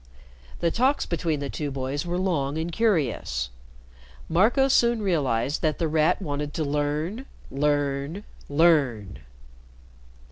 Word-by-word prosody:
The 170 - +2
talks 260 - +2
between 165 -4 -1
the 140 - -3
two 150 -2 -3
boys 135 +4 -3
were 175 +1 -1
long 160 -6 -1
and 165 +2 -2
curious. 135 - 0 0.8
Marco 225 - +3
soon 235 -4 +3
realized 145 - 0
that 155 -2 0
The 165 - 0
Rat 155 0 +2
wanted 145 -4 -4
to 160 - -1
learn 150 - -2 0.2
learn 145 +4 -1 0.3
learn. 140 - +2
155 Hz, 120 wpm, -25 LUFS, 140-180 Hz, 0.8 s, Marco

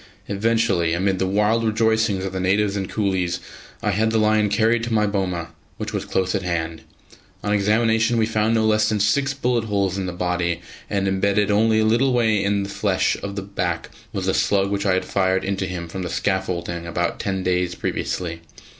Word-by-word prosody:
Eventually, 100 -5 +1
amid 95 +2 0
the 95 - +1
wild 105 +4 +2
rejoicings 110 -3 +1
of 95 - -4
the 95 - -2
natives 100 +2 +1
and 95 -2 -3
coolies, 95 -4 0 0.4
I 105 - +2
had 110 +3 +1
the 110 - +1
lion 110 -1 +3
carried 115 +3 +2
to 120 - -3
my 105 -1 +3
boma, 95 -5 -2 0.3
which - - -5
was - - -2
close 95 -1 0
at 100 - 0
hand. 85 -3 -3 0.6
On 105 - 0
examination 110 +3 +2
we 110 - +3
found 110 +1 +1
no 110 -1 +2
less 110 0 +3
than 110 -1 0
six 135 +7 +1
bullet 125 -3 0
holes 100 -3 0
in 95 - -2
the - - -2
body, 90 -1 -1 0.3
and 100 -1 0
embedded 100 +2 +1
only 110 +2 +3
a 110 - +3
little 120 +4 +3
way 110 -4 +2
in 100 0 +1
the 100 - -6
flesh 95 -2 +1
of 100 0 -5
the 100 - -4
back 90 -3 -3 0.2
was - - -3
the - - +1
slug 100 -1 +2
which 100 0 -1
I 95 - +3
had 95 - -1
fired 95 -1 +1
into 95 -1 -1
him 85 -1 -5
from 95 +3 -6
the 90 - -3
scaffolding 85 -3 -2
about 85 0 -2
ten 95 -1 -2
days 90 -1 0
previously. 85 -2 -3
100 Hz, 205 wpm, -22 LUFS, 95-110 Hz, 0.6 s, lion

